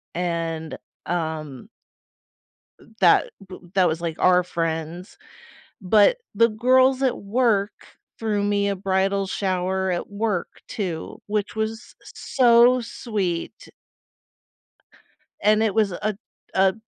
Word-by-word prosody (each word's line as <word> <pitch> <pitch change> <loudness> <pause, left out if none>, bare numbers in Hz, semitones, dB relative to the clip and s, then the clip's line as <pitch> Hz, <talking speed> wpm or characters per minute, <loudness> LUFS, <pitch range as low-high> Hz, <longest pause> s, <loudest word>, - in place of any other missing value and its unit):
and, 165 -2 -3 0.3
um 160 - -4 1.3
that - - +4 0.2
b 185 - -9 0.2
that 185 -3 +4
was, 160 +1 -2
like, 165 -2 -3
our 180 0 +4
friends. 165 +1 -4 0.6
But 210 - +4 0.2
the 230 +2 +4
girls 255 +4 +3
at 255 - +1
work 210 -1 +1 0.5
threw 210 -2 -1
me 205 0 +1
a 200 - -1
bridal 195 +1 0
shower 190 0 -1
at 175 - -3
work 205 -3 -3
too, 175 -7 -5
which 210 0 -2
was 220 +1 -4
so 245 0 +3
sweet. 205 -7 -4 1.8
And 215 +1 +4
it 220 -2 +1
was 210 -4 +2
a 210 +3 -3 0.4
a 190 0 +3
195 Hz, 110 wpm, -23 LUFS, 175-220 Hz, 1.8 s, that